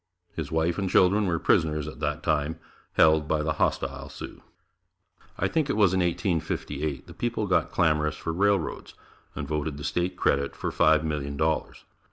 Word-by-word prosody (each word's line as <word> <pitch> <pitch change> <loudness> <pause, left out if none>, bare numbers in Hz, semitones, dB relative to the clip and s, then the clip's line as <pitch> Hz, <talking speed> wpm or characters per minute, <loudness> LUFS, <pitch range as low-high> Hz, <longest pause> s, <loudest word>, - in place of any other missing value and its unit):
His 80 -3 -4
wife 80 +2 +1
and 95 -1 -1
children 100 +3 +4
were 85 -2 +1
prisoners 75 -2 +1
at 75 - -8
that - - -2
time, 75 +2 0 0.4
held 80 -1 +4
by 75 -1 0
the 80 0 0
hostile 70 0 -1
Sioux. - - -9 1.0
I - - +1
think 155 -3 0
it 135 - 0
was 100 -4 +4
in 95 - +2
1858, 80 - -2
the - - -12
people 120 -3 -2
got 90 -4 +1
clamorous 75 -3 +1
for 80 - -4
railroads 100 -1 0 0.4
and 70 - -4
voted 75 0 -2
the 75 - -8
State 90 +4 -1
credit 70 0 +1
for - - -3
Five 80 0 +4
Million 70 -2 -3
Dollars. 80 +1 -1
80 Hz, 175 wpm, -26 LUFS, 75-90 Hz, 1.0 s, children